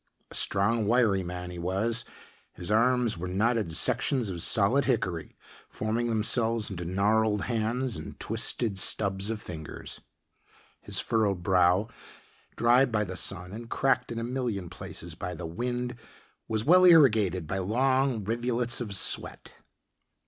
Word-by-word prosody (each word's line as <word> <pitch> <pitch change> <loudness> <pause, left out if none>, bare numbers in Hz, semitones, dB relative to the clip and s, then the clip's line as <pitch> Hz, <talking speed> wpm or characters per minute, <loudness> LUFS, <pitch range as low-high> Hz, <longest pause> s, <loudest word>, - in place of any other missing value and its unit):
A - - -10
strong, 105 +2 0
wiry 110 -5 +3
man 90 0 -6
he 90 - -8
was 110 +7 -1 0.5
his 90 +3 -6
arms 120 -2 +2
were 90 - -4
knotted 105 +1 0
sections 120 - +1
of 85 -2 -5
solid 120 +10 +4
hickory 95 -10 -2 0.3
forming 115 +2 -2
themselves 115 0 +1
into 90 -2 -5
gnarled 105 +3 +1
hands 120 0 -1
and 80 - -9
twisted 110 -6 -1
stubs 100 0 +3
of 115 -1 -3
fingers. 80 -6 -9 0.8
His - - -1
furrowed 100 -6 0
brow, 90 +2 +3 0.7
dried 120 +2 +3
by 105 -1 +1
the 95 -2 -6
sun 90 +1 -5
and 115 +2 -8
cracked 130 -2 0
in 115 - -5
a 115 - -3
million 120 -8 -3
places 85 -1 -7
by 90 +3 -6
the 85 +1 -7
wind 120 +8 -3 0.5
was 110 -1 -2
well 180 +4 +6
irrigated 110 - +5
by 95 +5 -3
long 130 +3 +1
rivulets 120 +3 -1
of 105 -4 -4
sweat. - - 0
110 Hz, 140 wpm, -27 LUFS, 95-120 Hz, 0.8 s, well